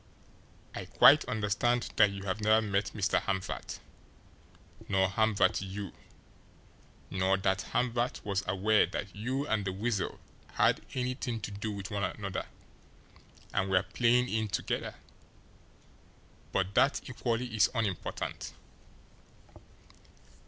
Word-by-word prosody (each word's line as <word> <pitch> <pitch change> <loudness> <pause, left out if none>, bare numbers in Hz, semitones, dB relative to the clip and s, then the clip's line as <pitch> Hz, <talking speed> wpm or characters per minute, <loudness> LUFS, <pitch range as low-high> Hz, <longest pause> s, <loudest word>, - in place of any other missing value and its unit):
I - - -5
quite - - +7
understand 110 +3 0
that 105 - +7
you 100 0 -7
have 100 +2 -2
never 110 +1 +5
met 105 -2 0
Hamvert, 95 -1 -1 1.1
nor 95 -1 +3
Hamvert 110 0 +2
you, 95 0 -6 1.2
nor 95 0 +2
that 95 0 0
Hamvert 125 0 0
was 100 -1 0
aware 100 +3 +3
that 100 -1 -5
you 130 +7 -2
and 110 -7 0
the 95 - -2
Weasel 105 +1 -2 0.3
had - - +3
anything 125 -2 -2
to - - -5
do 105 +2 -4
with 100 0 -6
one 100 -1 -1
another 95 0 -3 1.1
and 95 - 0
were 95 0 +3
playing 120 +6 +2
in 110 -2 -1
together 100 - -2 1.6
but 95 0 0
that 140 +6 +2
equally 120 -1 -2
is 105 -5 +5
unimportant. 105 -6 -3
105 Hz, 115 wpm, -31 LUFS, 95-115 Hz, 1.6 s, quite